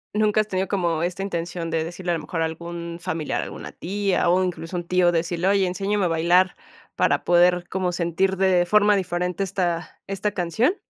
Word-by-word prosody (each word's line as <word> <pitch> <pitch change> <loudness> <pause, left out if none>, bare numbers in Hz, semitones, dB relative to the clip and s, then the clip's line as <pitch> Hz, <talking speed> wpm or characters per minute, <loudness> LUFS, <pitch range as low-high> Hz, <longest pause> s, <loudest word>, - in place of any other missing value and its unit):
¿Nunca 215 0 +3
has 215 - -5
tenido 190 -1 -1
como 170 -5 0
esta 180 +3 -2
intención 170 -2 -4
de 160 -1 0
decirle 175 +2 -4
a - - +2
lo - - -3
mejor 165 +1 -2
a - - +2
algún 170 +1 -6
familiar, 165 -4 -2
alguna - - -7
tía, 195 -1 0
o 185 +1 +3
incluso 180 -1 -4
un 175 - -3
tío 180 -1 +3
decirle: 170 +2 -1
"Oye, 195 -1 +3
enséñame 195 +2 0
a - - +3
bailar 175 +3 +3 0.4
para - - +2
poder 175 0 +4
como 185 -1 -1
sentir 180 +2 0
de 185 -2 +3
forma 210 0 +5
diferente 180 0 -1
esta 175 -3 -2
esta 195 +1 -2
canción" 200 - +1
180 Hz, 195 wpm, -23 LUFS, 170-195 Hz, 0.4 s, forma